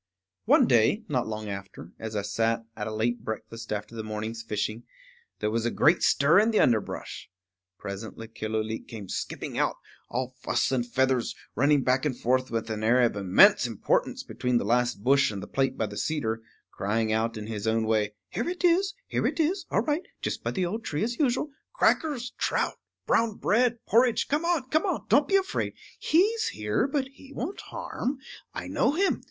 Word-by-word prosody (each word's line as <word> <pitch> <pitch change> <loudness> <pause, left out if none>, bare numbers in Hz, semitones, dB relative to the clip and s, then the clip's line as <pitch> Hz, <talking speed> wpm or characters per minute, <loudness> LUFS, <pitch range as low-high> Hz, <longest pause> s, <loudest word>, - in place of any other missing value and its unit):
One - - +6
day, 125 - +3
not 130 -5 0
long 110 -1 -4
after, 100 -4 -7
as 110 -1 -5
I 100 - -1
sat 115 +3 0
at 105 -1 -4
a - - -3
late 115 +3 -1
breakfast 110 +1 -6
after 105 +1 -4
the 115 - -4
morning's 110 +1 -4
fishing, 110 0 -3 0.6
there 105 - -1
was 115 0 0
a 120 - +1
great 155 +8 +3
stir 150 +7 +5
in 220 +2 +4
the 220 - +2
underbrush. 110 -4 0 0.5
Presently 110 +3 -7
Killooleet 110 0 -3
came 105 -4 -8
skipping - - -4
out, - - +1 0.3
all 130 +1 -3
fuss - - +1
and 120 -2 0
feathers, 130 -1 +1 0.2
running 145 +2 +3
back 130 +1 +2
and 140 -5 -1
forth 130 +2 +1
with 115 -1 -2
an 110 0 -3
air 120 +3 +4
of 120 - +2
immense 110 - +5
importance 115 -4 0
between 125 -1 -1
the 120 - -1
last 120 -1 +1
bush 140 +2 +4
and 100 -2 -5
the - - -8
plate 135 -1 0
by 110 - 0
the 105 0 -7
cedar, 115 -8 -1 0.3
crying 110 +3 0
out 115 +1 0
in 105 - -5
his 110 -1 -4
own 110 0 +2
way, 105 -1 +1
"Here - - -2
it 365 +1 -5
is, 365 +3 +3
here - - 0
it - - -3
is, 340 +4 +1
all 205 - +2
right, 300 +5 0 0.2
just - - -3
by - - -1
the 185 -2 -1
old 220 +6 -3
tree 150 +4 -2
as 235 +1 -2
usual. 285 +1 +1 0.2
Crackers, 290 - +1
trout, - - 0 0.3
brown 225 -2 +2
bread, 240 +2 +2
porridge; 235 +1 +3
come 300 +4 0
on, 335 -7 +1
come 310 +2 +2
on; - - -2
don't - - +5
be 390 - +2
afraid. 385 -1 0 0.2
He's 430 +7 +2
here, 105 - 0
but 280 -2 -1
he 275 0 -16
won't 320 +11 -4
harm. 265 +3 -4 0.3
I - - -6
know - - +1
him. 385 +5 +1
120 Hz, 195 wpm, -27 LUFS, -, 0.6 s, One